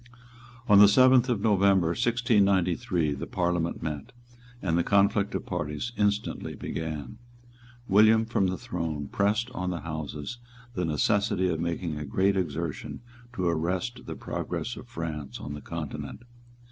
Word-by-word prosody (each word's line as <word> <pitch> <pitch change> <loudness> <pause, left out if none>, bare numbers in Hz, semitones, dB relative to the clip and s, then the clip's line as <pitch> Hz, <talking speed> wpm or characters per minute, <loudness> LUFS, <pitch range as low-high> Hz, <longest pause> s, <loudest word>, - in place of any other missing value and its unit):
On 105 -2 +7
the 105 - +10
seventh 130 +4 +5
of 115 -5 0
November 100 -5 +3
1693 100 - +2
the 70 - -6
Parliament 85 -2 -1
met; 75 -3 -5 0.5
and 85 -6 0
the 85 - +2
conflict 100 +1 +2
of - - -3
parties 75 +10 -3
instantly 105 0 -1
began. 75 -5 -5 0.7
William 110 +3 +5
from 105 -4 +1
the 95 0 -2
throne 80 -3 -4
pressed 105 +5 0
on 90 -7 -3
the 85 -4 -3
Houses 80 +7 -5 0.3
the 90 -6 -1
necessity 95 +4 +1
of 80 -2 -1
making 85 -2 -2
a 75 - -4
great 95 +8 +1
exertion 85 -3 -3 0.3
to 95 -6 -1
arrest 90 +9 -2
the - - -5
progress - - -4
of - - -10
France 75 -5 -5
on 75 - -6
the 75 - -7
Continent. 85 - -6
90 Hz, 145 wpm, -27 LUFS, 80-105 Hz, 0.7 s, the